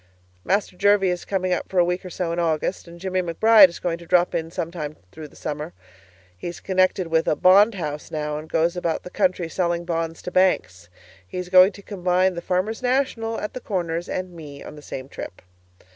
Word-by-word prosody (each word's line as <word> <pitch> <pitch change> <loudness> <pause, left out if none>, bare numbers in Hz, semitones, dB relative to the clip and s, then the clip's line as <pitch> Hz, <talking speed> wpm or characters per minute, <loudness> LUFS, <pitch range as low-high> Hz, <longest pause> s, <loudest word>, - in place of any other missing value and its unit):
Master 195 -1 0
Jervie 200 -1 +3
is 180 - -4
coming 185 -2 0
up - - -3
for 190 - -4
a 175 - +6
week 180 +1 -2
or 185 - -7
so 175 -1 -3
in 170 - -2
August, 165 +2 -1
and 170 0 -12
Jimmie 185 0 -1
McBride 195 +4 +6
is 170 - -9
going 170 -2 -2
to 170 - -13
drop 180 0 +3
in 165 -1 -2
sometime 165 -3 -5 0.2
through 155 +4 -9
the - - -21
summer. 150 +3 -5 0.6
He's 170 - -7
connected 185 -1 +1
with 165 0 +1
a - - +3
bond 200 +6 +5
house 150 -5 -5
now, 150 -1 -3
and 155 +1 -11
goes 165 +2 +1
about 170 -2 -2
the 180 - -9
country 185 -4 +1
selling 170 0 -1
bonds 165 -1 -3
to 180 - -5
banks. 135 - +1 0.4
He's 180 - -5
going 185 +2 +7
to 200 - -13
combine 185 -1 +1
the 170 - -5
'Farmers' 185 +7 -1
National' 245 -3 0
at 210 - -5
the 255 - -6
Corners 175 -5 -3
and 185 -1 -4
me 150 -4 -10
on - - -10
the 150 - -11
same 130 -2 -7
trip. 90 - -8
180 Hz, 210 wpm, -23 LUFS, 165-185 Hz, 0.6 s, going